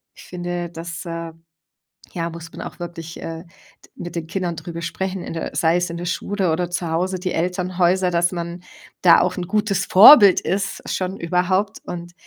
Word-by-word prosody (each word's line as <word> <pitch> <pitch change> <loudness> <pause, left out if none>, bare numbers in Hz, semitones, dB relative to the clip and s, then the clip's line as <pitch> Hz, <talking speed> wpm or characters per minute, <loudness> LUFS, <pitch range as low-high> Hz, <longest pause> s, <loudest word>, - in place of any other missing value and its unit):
ich - - -14
finde, 175 -1 -4
das, 170 0 -7
äh, 165 -1 -5 0.8
ja, 170 -1 -2
muss 165 0 -9
man - - -8
auch - - -8
wirklich, 165 -1 -7
äh, 165 +1 -6
de 170 - -24
mit 175 0 -7
den 165 -1 -3
Kindern 175 0 -3
darüber 170 +1 -7
sprechen 190 +2 -3
in - - -6
der 165 - -5
sei 165 +1 +3
es 180 0 0
in 170 - -5
der 170 - -5
Schule 190 0 -1
oder 175 +2 -1
zu 175 -1 -3
Hause. 185 +3 -1
Die 185 0 -2
Elternhäuser, 180 +1 +1
dass 175 0 +1
man 170 0 -5 0.4
da 170 -2 +7
auch 180 - 0
'n 175 - -3
gutes 205 0 0
Vorbild 205 0 +9
ist 195 +1 -2
schon 185 +1 -2
überhaupt 185 +4 0
und 175 0 -7
175 Hz, 190 wpm, -21 LUFS, 170-185 Hz, 0.8 s, Vorbild